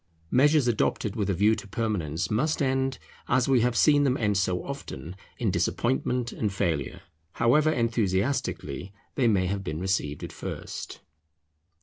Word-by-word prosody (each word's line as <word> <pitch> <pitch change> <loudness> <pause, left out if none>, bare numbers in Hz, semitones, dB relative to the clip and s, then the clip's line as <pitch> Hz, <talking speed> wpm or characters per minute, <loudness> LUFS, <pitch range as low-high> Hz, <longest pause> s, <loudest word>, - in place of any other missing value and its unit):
Measures 145 +1 +4
adopted 105 -2 0
with 105 -3 -1
a - - +2
view 105 +5 +4
to 105 - -5
permanence 95 -7 -2
must 150 +9 +1
end, 135 -1 0 0.3
as 125 0 +2
we 130 -3 +4
have 120 0 +1
seen 145 -2 +5
them 135 -1 +2
end 105 -3 +1
so 95 -2 0
often, 140 - -7 0.2
in 110 -5 0
disappointment 120 +6 0
and 105 -2 -2
failure, 85 -8 -2 0.3
however 145 +7 +3
enthusiastically 110 - -1 0.2
they 130 -4 +2
may 100 -5 +3
have 100 +1 -2
been 75 -3 -4
received 90 -6 -1
at - - -6
first. - - -7
110 Hz, 150 wpm, -27 LUFS, 95-130 Hz, 0.3 s, seen